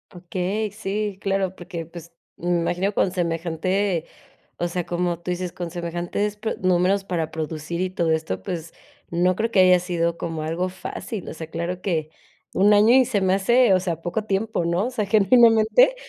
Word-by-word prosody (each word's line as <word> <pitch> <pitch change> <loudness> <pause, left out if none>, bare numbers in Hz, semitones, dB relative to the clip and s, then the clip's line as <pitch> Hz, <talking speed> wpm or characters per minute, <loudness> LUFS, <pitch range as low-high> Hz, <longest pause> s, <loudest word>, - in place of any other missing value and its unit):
Okey, 185 +4 -2
sí, 205 -1 -3
claro, 195 -1 0
porque, 170 -1 -6
pues, 170 0 -12 0.2
me 175 0 0
imagino 185 +4 0
con 185 - +1
semejante, 175 +1 -1 0.5
o 175 - -1
sea, 175 0 -2
como 175 0 -2
tú 180 - -5
dices, 180 0 -3
con 175 -1 -5
semejantes, 175 +4 -3
pues 220 +1 -3
números 185 +2 +2
para 165 -4 -2
producir 160 +2 -4
y 185 - +1
todo 170 -3 0
esto, 155 -13 -1
pues, 165 - -5 0.4
no 180 +2 +2
creo 225 +1 -1
que 190 - +5
haya 185 -1 +6
sido 170 -1 -1
como 165 -2 -4
algo 170 +4 -2
fácil, 190 +2 -6
o - - -6
sea, 160 0 -7
claro 170 +2 -4
que, 160 -5 -1 0.4
un 205 +2 +4
año 215 +4 +6
y 260 0 +6
se 230 -5 0
me 190 0 +2
hace, 235 +2 +4
o - - +4
sea, 170 -3 -3
poco 210 +6 -2
tiempo, 205 -2 -1
¿no?, 175 +6 +1
o - - -3
sea, 230 -4 -1
genuinamente. 225 - +5
180 Hz, 185 wpm, -23 LUFS, 170-200 Hz, 0.5 s, haya